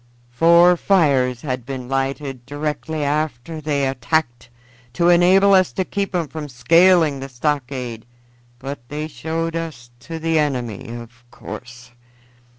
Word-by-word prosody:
Four 170 +6 +5
fires 135 -11 +2
had 130 -4 -3
been 130 0 -6
lighted 135 -1 -3
directly 150 +1 -3
they 150 0 -1
attacked 125 -1 -1 0.4
to 170 +7 +2
enable 185 +3 +5
us 185 -2 +4
to 190 - -1
keep 200 -1 -3
'em 170 -3 0
from 150 +1 -7
scaling 165 +3 +4
the 135 0 -7
stockade, 125 -3 -3 0.5
but 135 +3 -6
they 150 +1 -4
showed 160 +4 -4
us 155 -8 -6
to 165 +4 -7
the 160 0 +1
enemy, 125 -8 -2
of 120 +1 -10
course. 120 0 -10
145 Hz, 130 wpm, -20 LUFS, 125-165 Hz, 0.5 s, Four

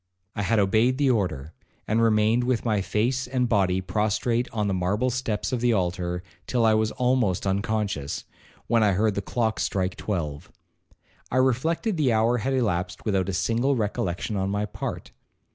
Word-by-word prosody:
I 105 - -2
had 115 +3 +1
obeyed 110 +6 +3
the 140 -2 +3
order, 90 - -2 0.3
and 110 +2 +2
remained 110 +1 +3
with 125 -2 0
my 105 -3 +1
face 120 +7 0
and 125 -1 0
body 95 -4 +2
prostrate 110 +5 0
on 105 -4 -1
the 100 - 0
marble 100 +7 0
steps 115 -4 -2
of 125 -2 -1
the 120 -1 +3
altar, 90 -2 -1 0.2
till 120 -2 +1
I 110 - +5
was 110 0 +1
almost 125 -8 +1
unconscious, 100 -6 -2 0.4
when 115 -1 +2
I 105 -2 +4
heard 105 +3 +2
the 100 - -2
clock 110 +2 -1
strike 95 -1 -1
twelve. 75 -8 -4 0.8
I 130 - -1
reflected 160 - +1
the 135 -6 +2
hour 115 +3 +2
had 135 +5 -1
elapsed 90 -7 -1
without 95 -3 0
a - - -2
single 115 +9 +1
recollection 105 -3 -2
on 95 0 -1
my 100 +1 -1
part. 105 - -6
110 Hz, 175 wpm, -25 LUFS, 95-120 Hz, 0.8 s, I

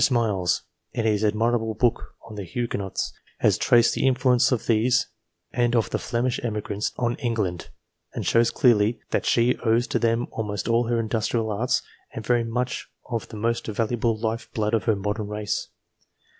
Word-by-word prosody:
Smiles, 105 - +1 0.3
in 115 -2 -1
his 105 -1 +2
admirable 110 +1 +1
book 120 +1 0
on 110 - -10
the 105 -1 -5
Huguenots, 100 0 -3 0.2
has - - +2
traced 120 -1 +4
the - - +1
influence 130 -1 +3
of 125 - 0
these 115 +2 +3 0.5
and 120 0 +1
of 115 - +1
the - - 0
Flemish 120 0 -1
emigrants 105 -2 -2
on 120 -1 0
England, 105 -8 -2 0.5
and - - -3
shows 115 0 +4
clearly 115 -4 +3
that - - 0
she 120 +1 +3
owes 115 +1 +2
to - - -1
them 115 +1 +1
almost 105 -3 -3
all 115 0 +2
her 120 0 +1
industrial 110 0 -1
arts 115 +5 0 0.3
and 110 - -5
very 120 0 +2
much 120 +2 -3 0.2
of 115 -2 -2
the 110 - -9
most 115 +2 -1
valuable 115 +1 0
life 110 +1 -3
blood 105 0 0
of 110 -4 +1
her 110 - +3
modern 105 +2 -3
race. 105 0 -3
115 Hz, 170 wpm, -25 LUFS, 105-120 Hz, 0.5 s, traced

